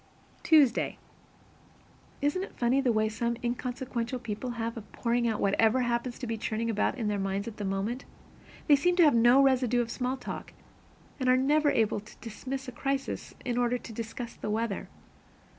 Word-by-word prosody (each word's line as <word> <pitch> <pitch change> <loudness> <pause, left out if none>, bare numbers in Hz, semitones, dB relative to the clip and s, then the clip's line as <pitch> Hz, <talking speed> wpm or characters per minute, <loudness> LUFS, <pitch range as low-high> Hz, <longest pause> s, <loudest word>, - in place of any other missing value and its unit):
Tuesday. 290 -7 +4 1.3
Isn't 295 +6 +1
it 390 - -7
funny, 250 +3 +2
the 255 -3 +2
way 215 -1 +2
some 235 +2 -2
inconsequential 245 0 -3
people 235 0 -5
have 230 0 -2
of 220 -3 -10
pouring 235 0 0
out 220 -2 -1
whatever 225 +5 +3
happens 240 0 -1
to 255 - -5
be 225 -1 -3
churning 225 +1 -1
about 215 +4 0
in 225 -4 -2
their 205 -1 0
minds 195 +1 -2
at 225 - -7
the 205 - -4
moment? 195 +7 -2 0.6
They 290 - +7
seem 355 +6 +2
to 350 - +6
have 300 - +6
no 240 +4 +6
residue 250 -3 +3
of 235 -1 -1
small 255 +2 -2
talk, - - -7 0.7
and 255 -1 +1
are 255 - +6
never 290 +3 +3
able 220 -6 +2
to 215 +2 -15
dismiss 260 +4 -6
a - - -5
crisis 275 +2 -3
in 245 -1 0
order 245 0 +2
to 235 -1 -10
discuss 230 +2 -6
the - - -6
weather. 220 -1 -2
240 Hz, 185 wpm, -29 LUFS, 225-260 Hz, 1.3 s, They